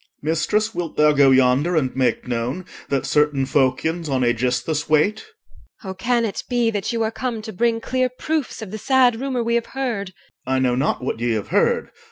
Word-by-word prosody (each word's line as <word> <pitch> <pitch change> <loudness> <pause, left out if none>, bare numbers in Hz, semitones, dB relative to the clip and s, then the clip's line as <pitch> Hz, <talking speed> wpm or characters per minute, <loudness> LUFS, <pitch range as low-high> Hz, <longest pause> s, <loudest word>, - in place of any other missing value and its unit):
OR. 155 - -2
Mistress, 210 +7 0
wilt 175 -4 -5
thou 150 0 +5
go 140 -2 +5
yonder 130 +6 +3
and 135 -5 0
make 125 -3 0
known, 125 +9 -3 0.2
That 140 -2 0
certain 150 -2 +2
Phocians 145 +5 0
on 130 -2 +1
Aegisthus 125 +6 0
wait? 180 +8 +2 0.6
EL. 190 - -5
Oh! - - -5
can 235 +5 0
it 205 - -3
be 240 -2 +1
that 205 -3 -2
you 230 -1 0
are 220 - -1
come 230 -2 -4
to 220 -1 -7
bring 230 +3 +1
Clear 255 +2 0
proofs 275 -1 -3
of 195 - -9
the 215 - -6
sad 250 -1 +3
rumour 260 -3 -1
we 235 0 -1
have 235 -1 0
heard? 205 -8 -3 0.3
OR. 130 - 0
I - - +2
know 130 -1 +2
not 130 +1 0
what 125 - -3
ye 120 0 0
have 110 -2 -3
heard. - - +1
175 Hz, 215 wpm, -21 LUFS, -, 0.6 s, thou